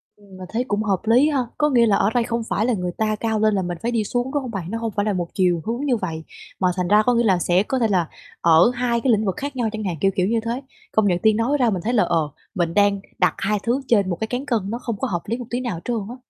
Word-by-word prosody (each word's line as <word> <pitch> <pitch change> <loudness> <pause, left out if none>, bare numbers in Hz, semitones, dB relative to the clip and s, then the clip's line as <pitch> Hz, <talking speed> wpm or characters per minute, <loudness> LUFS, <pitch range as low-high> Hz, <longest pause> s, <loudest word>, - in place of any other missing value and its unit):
Ừm, 200 -2 -16
mình 185 - -8
thấy 235 +3 -1
cũng 205 +1 0
hợp 195 -4 0
lý 245 +7 +4
ha, 265 -4 0
có 295 - +2
nghĩa 240 -4 +4
là 205 -3 +3
ở 200 - +2
đây 240 -1 +2
không 235 -1 -2
phải 215 - 0
là 250 - +1
người 180 -3 -2
ta 215 -1 0
cao 220 0 -1
lên 215 -1 +3
là 195 - +1
mình 175 -1 -4
phải 235 - -1
đi 225 -3 +1
xuống, 245 +5 -2
đúng 290 - 0
không 245 - -6
bạn? 190 -2 -5
Nó 230 - -2
hông 230 -1 -3
phải 205 0 -1
là 210 - +1
một 175 -2 -2
chiều 180 -4 +1
hướng 240 +6 -2
như 250 -4 +2
vậy 160 -5 -4 0.4
mà 185 - +2
thành 180 -2 -1
ra 210 +2 +5
có 245 - +3
nghĩa 235 0 +2
là 190 -5 +3
sẽ 180 +3 +2
có 260 +3 -2
thể 225 - +2
là 180 -5 +1 0.3
ở 165 +7 +5
hai 240 -1 0
cái 260 - +2
lĩnh 215 -1 +2
vực 190 - -1
khác 285 0 -5
nhau 240 -3 0
chẳng 220 -1 -5
hạn, 180 -4 -2
kiểu 195 - +3
kiểu 185 0 +1
như 230 +2 +1
thế. 235 +3 -2 0.3
Công 215 -2 +2
nhận 175 -2 +1
Tiên 220 0 +3
nói 260 +6 +1
ra 245 -3 +3
mình 185 -5 -2
thấy 240 +4 -1
là, 215 - +4
ờ, 160 -3 0 0.3
mình 170 -3 0
đang 200 -1 +3 0.2
đặt - - +3
2 210 +1 0
thứ 245 +4 0
trên 200 -5 +3
1 175 - -1
cái 220 - -2
cán 250 +4 -3
cân 235 -5 +1
nó 235 +3 -3
không 230 -4 -4
có - - -1
hợp 175 -3 -2
lý 230 +3 -2
một 245 - -7
tí 245 - -2
nào 230 -10 -3
trơn 240 - -1
á. 245 - -7
215 Hz, 325 wpm, -22 LUFS, 190-240 Hz, 0.4 s, ra